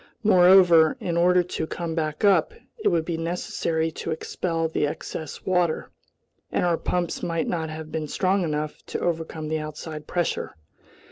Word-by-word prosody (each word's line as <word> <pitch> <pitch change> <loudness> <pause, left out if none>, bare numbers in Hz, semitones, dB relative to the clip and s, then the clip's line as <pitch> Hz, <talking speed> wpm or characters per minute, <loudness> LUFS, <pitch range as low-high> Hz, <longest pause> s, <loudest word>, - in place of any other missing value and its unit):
Moreover, 180 -5 +6
in 170 - -2
order 180 +1 +4
to 160 -2 -4
come 170 -1 -4
back 155 +2 -1
up, 205 - +3 0.3
it - - +3
would 165 -2 +2
be 170 -1 -2
necessary 165 -1 -1
to - - -6
expel 165 +1 -2
the 155 -2 0
excess 155 +1 -6
water, 180 -3 0 0.6
and - - +1
our 170 -2 +2
pumps 175 -2 -2
might 165 -1 -1
not 160 -2 -2
have 155 0 -7
been 155 -1 -3
strong 190 +5 +1
enough 150 -2 -2
to - - -3
overcome 160 -2 -2
the 155 0 -1
outside 155 0 -7
pressure. 175 -1 -2
165 Hz, 160 wpm, -25 LUFS, 160-175 Hz, 0.6 s, Moreover